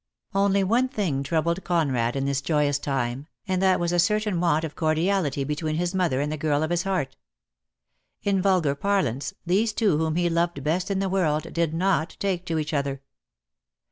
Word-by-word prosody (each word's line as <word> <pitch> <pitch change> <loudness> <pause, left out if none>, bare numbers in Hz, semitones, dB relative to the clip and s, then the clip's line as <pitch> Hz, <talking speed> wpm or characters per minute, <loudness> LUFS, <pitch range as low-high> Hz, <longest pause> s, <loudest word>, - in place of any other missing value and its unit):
Only 195 0 +3
one 235 +7 +2
thing 190 - -1
troubled 170 +5 0
Conrad 135 -9 0
in 135 0 -1
this 140 -1 0
joyous 145 -2 +1
time, 135 0 -2 0.2
and 185 -1 0
that 190 -1 +3
was 175 0 0
a 175 - +2
certain 210 0 +1
want 165 -2 +2
of 155 -2 -5
cordiality 160 -2 +1
be 150 +2 -2
tween 155 0 -2
his 175 +2 -1
mother 175 -8 +1
and 145 +1 -1
the 155 - -3
girl 150 -1 +1
of 160 - -2
his 175 -1 +1
heart. 185 - -2 1.1
In 195 -2 +1
vulgar 180 -7 +2
parlance, 190 - -1
these 210 +5 +2
two 200 -10 +2
whom 160 -1 0
he 175 0 +2
loved 170 -3 0
best 170 +6 0
in 195 - 0
the 195 0 0
world 165 -5 0
did 165 -2 0
not 170 -2 0
take 185 -2 -2
to 165 - -1
each 155 0 -2
other. 140 -1 -2
170 Hz, 195 wpm, -25 LUFS, 150-190 Hz, 1.1 s, Only